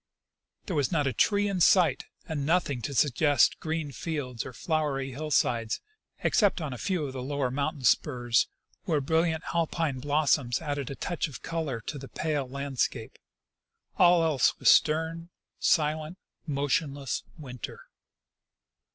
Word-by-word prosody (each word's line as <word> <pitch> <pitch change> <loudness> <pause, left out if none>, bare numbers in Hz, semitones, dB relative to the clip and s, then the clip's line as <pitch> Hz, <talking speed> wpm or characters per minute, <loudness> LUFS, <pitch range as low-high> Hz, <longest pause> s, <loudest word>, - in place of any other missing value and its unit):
There 185 - -3
was 145 -4 +1
not 150 -4 +1
a 135 - 0
tree 205 0 +2
in 195 -3 -1
sight, 170 -5 +4 0.2
and 155 -4 -3
nothing 145 -5 +1
to 140 - -4
suggest 145 +2 +3
green 160 -2 -3
fields 130 -4 -4
or - - -7
flowery 140 -1 -1
hill 155 +4 -5
sides, 115 -5 +1 0.4
except 205 -5 +3
on 155 -5 -4
a - - -6
fcAV 180 +1 -1
of 135 - -6
the 130 - -5
lower 135 -1 -2
mountain 140 +1 -2
spurs, 120 -1 +2 0.4
where 155 - +1
brilliant 160 +3 +1
Alpine 165 -4 0
blossoms 145 -3 +1
added 145 -4 -3
a 140 - -5
touch 175 +3 -2
of 145 - -10
color 160 -8 -3
to 145 +6 -6
the 135 - -9
pale 145 -5 -2
land 140 -1 -5
scape. 115 -3 -1 0.8
All 175 -1 +6
else 150 -6 +2
was - - +6
stern, 160 +2 +2 0.3
silent, 155 +2 +1 0.3
motionless 140 -1 -1 0.2
winter. 125 -6 -8
145 Hz, 150 wpm, -28 LUFS, 135-160 Hz, 0.8 s, All